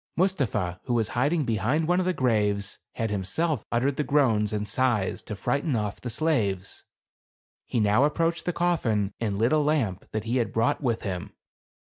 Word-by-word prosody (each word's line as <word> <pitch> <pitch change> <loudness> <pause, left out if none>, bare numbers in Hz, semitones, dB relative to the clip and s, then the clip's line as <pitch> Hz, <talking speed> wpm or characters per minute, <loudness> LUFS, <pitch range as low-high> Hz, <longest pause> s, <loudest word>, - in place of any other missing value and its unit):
Mustapha, 120 - 0
who 125 - 0
was 115 -2 +1
hiding 145 +5 +1
behind 125 +8 0
one 175 +1 +3
of 185 - 0
the - - +3
graves, 105 - 0
had 115 -2 -2
himself 105 - -1
uttered 130 +4 +1
the 150 - +1
groans 120 -9 +2
and 105 -1 -2
sighs 115 -3 +1
to 105 - -6
frighten 140 - -1
off 105 -2 -2
the 125 - -4
slaves. 105 - -1 0.8
He 120 - 0
now 105 +4 +4
ap 150 - -6
proached 165 0 0
the 175 - +1
coffin 115 - 0
and 105 -4 -1
lit 115 +7 +2
a 155 - +4
lamp 140 -11 0
that 110 -1 -3
he 115 +3 0
had 120 - 0
brought 140 +8 +1
with 120 -5 -1
him. 90 -4 -4
120 Hz, 185 wpm, -26 LUFS, 105-150 Hz, 0.8 s, now